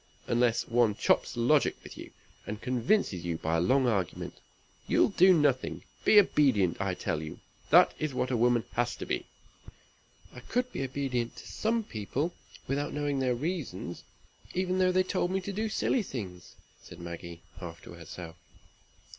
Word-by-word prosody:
Unless 120 -1 +2
one 115 -3 +3
chops - - +1
logic 130 +5 +3
with - - -10
you, - - -9 0.4
and 105 0 -4
convinces 125 - +1
you 85 -2 -2
by 80 +1 0
a - - +1
long 130 +8 +3
argument, 100 -8 -2 0.5
you'll - - +4
do 190 -1 +6
nothing. 145 -7 +2 0.2
Be 215 - +6
obedient, 120 - +3
I 95 -2 -1
tell 75 - -2
you. 80 -1 -7 0.3
That - - +7
is 155 -1 -1
what 130 0 -1
a - - +2
woman 120 0 +3
has 120 0 0
to - - -6
be." - - -2 1.1
"I - - -9
could 250 - -2
be - - -4
obedient 130 -3 -2
to - - -11
some 225 +1 0
people, 140 - -3 0.3
without 145 +2 -1
knowing 145 -1 -1
their 130 -2 +1
reasons, 125 - -4 0.5
even 185 0 0
though 185 0 +4
they 185 0 +3
told 185 -1 -1
me 190 +1 0
to 200 +2 -5
do 215 +3 -1
silly 235 +3 +1
things," 95 - -7 0.3
said 85 - -12
Maggie, 85 0 -8 0.2
half 85 -3 -8
to - - -11
herself. 85 0 -9
125 Hz, 170 wpm, -30 LUFS, -, 1.1 s, That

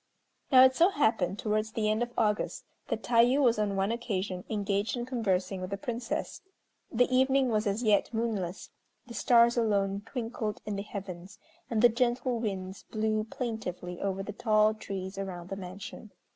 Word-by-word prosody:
Now 255 -1 +9
it 260 0 +6
so 345 +3 +5
happened 220 - +1
towards 215 +1 -1
the 215 -2 0
end 215 +2 +1
of 240 0 -1
August 210 -2 0 0.2
that - - -3
Tayû 245 +3 +4
was 240 -6 +3
on 205 -2 0
one 195 +2 +1
occasion 195 -6 -3
engaged 205 +1 -1
in 240 - -3
conversing 195 -6 -1
with 185 - -4
the 200 - -3
Princess. 235 +3 -4 0.5
The 245 +2 +4
evening 265 0 +3
was 215 -1 +1
as 200 +4 -1
yet 210 -3 +3
moonless, 220 -6 -3 0.3
the 235 - -10
stars 235 0 +4
alone 200 -3 +1
twinkled 225 -4 -4
in 210 - -3
the 200 - -3
heavens, 195 -1 -8 0.3
and 225 -2 0
the - - +10
gentle 240 +1 0
winds 190 -3 -4
blew 215 0 0
plaintively 215 -7 -5
over 195 0 -2
the 205 - -6
tall 215 0 +3
trees 195 -2 -6
around 180 -2 -6
the 195 - -3
mansion. 195 +3 -8
215 Hz, 170 wpm, -29 LUFS, 195-235 Hz, 0.5 s, the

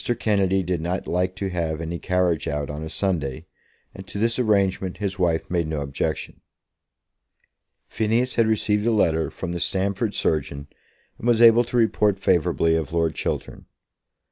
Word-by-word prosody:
Kennedy 95 -3 +1
did 90 -2 -2
not 90 +3 -2
like 90 +1 -1
to 95 -1 -3
have 80 -3 -2
any 85 +1 -4
carriage 90 -3 0
out 75 -2 -2
on 75 +1 -6
a 80 - -6
Sunday, 80 -9 -2 0.5
and 95 0 -11
to - - -7
this 115 +4 +1
arrangement 100 -5 +1
his 100 -2 -4
wife 85 -3 +1
made 85 -3 0
no 80 -2 -3
objection. 70 -1 -3 1.5
Phineas 115 +3 0
had 115 -1 +2
received 105 0 +1
a - - +3
letter 80 -7 +2
from 90 - -6
the 85 - -3
Stamford 100 +4 -1
surgeon, 70 -2 -1 0.5
and 115 - -4
was 120 -2 +4
able 115 0 +7
to 120 - -2
report 105 -3 +2
favourably 85 -3 +2
of 80 -1 -2
Lord 80 -1 +1
Chiltern. - - -4
90 Hz, 165 wpm, -23 LUFS, 80-105 Hz, 1.5 s, able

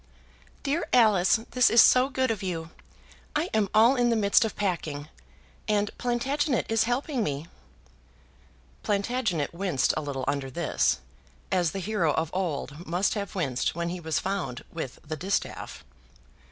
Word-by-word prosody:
"Dear 295 +4 -1
Alice, 215 -3 +4
this 250 -1 +4
is 230 - +5
so 255 +3 +6
good 260 -3 0
of 215 - -3
you! 165 -3 -4 0.6
I 315 +5 0
am 210 -3 +2
all 230 +5 +5
in 245 -2 +2
the 230 - +2
midst 200 -1 +4
of 220 - -3
packing, 160 -7 -3 0.6
and 210 -1 0
Plantagenet 255 +3 0
is 225 -1 +2
helping 245 +1 -1
me." 145 -1 -3 1.4
Plantagenet 205 - -1
winced 170 -7 +1
a 155 - -1
little 135 -3 -4
under 140 -2 -1
this, 130 - 0 0.5
as 180 -3 +2
the - - -5
hero 190 -5 0
of 160 0 -1
old 170 -3 -3
must 175 +4 +1
have 200 -3 -4
winced 135 -9 -1
when 170 0 -2
he 180 +1 -4
was 160 -2 -2
found 175 -11 -3
with 160 -7 -5
the 155 +1 -4
distaff. 190 +6 -3
195 Hz, 155 wpm, -27 LUFS, 160-230 Hz, 1.4 s, so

